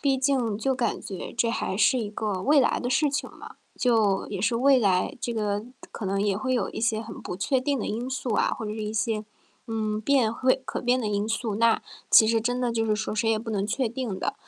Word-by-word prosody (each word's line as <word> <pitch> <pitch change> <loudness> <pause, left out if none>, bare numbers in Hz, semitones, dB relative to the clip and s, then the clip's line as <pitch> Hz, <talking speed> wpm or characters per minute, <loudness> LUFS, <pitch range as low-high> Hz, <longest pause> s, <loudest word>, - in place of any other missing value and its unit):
毕 275 -2 +2
竟 255 -6 +1
就 265 +4 0
感 250 -2 -1
觉 190 - -7
这 235 -1 +1
还 190 - -2
是 225 +5 +4
一 210 -2 -4
个 210 -3 -3
未 290 +6 +4
来 265 - +2
的 245 - -2
事 300 +3 +3
情 280 - -3
嘛， - - -12 0.2
就 220 -6 +2
也 200 -3 -5
是 230 +4 +1
未 265 +1 +5
来， 195 +6 +1
这 235 - -2
个 210 -2 -1 0.3
可 220 - -6
能 195 +1 0
也 200 -1 +1
会 255 +5 -2
有 245 -5 0
一 - - -6
些 225 -1 +1
很 220 -2 -9
不 180 - -5
确 255 +7 +1
定 280 +1 0
的 - - -3
因 240 +4 -3
素 255 -2 -2
啊， - - +2
或 - - -5
者 210 - -4
一 215 -1 -4
些， 220 0 -1 0.4
嗯， 215 -2 -2
变 240 -2 +2
会 255 +2 +1
可 - - -4
变 250 +1 +2
的 225 - -2
因 205 +1 -1
素， 225 -1 -2
那 230 0 +3 0.3
其 220 - +8
实 225 0 +2
真 245 +2 -1
的 245 -2 0
就 225 -1 0
是 215 -1 +1
说 215 0 -3
谁 225 +1 +1
也 220 - +2
不 225 +1 -6
能 200 -2 -1
确 245 +4 0
定 235 -4 -4
的。 - - -2
225 Hz, 270 characters per minute, -26 LUFS, 210-255 Hz, 0.4 s, 其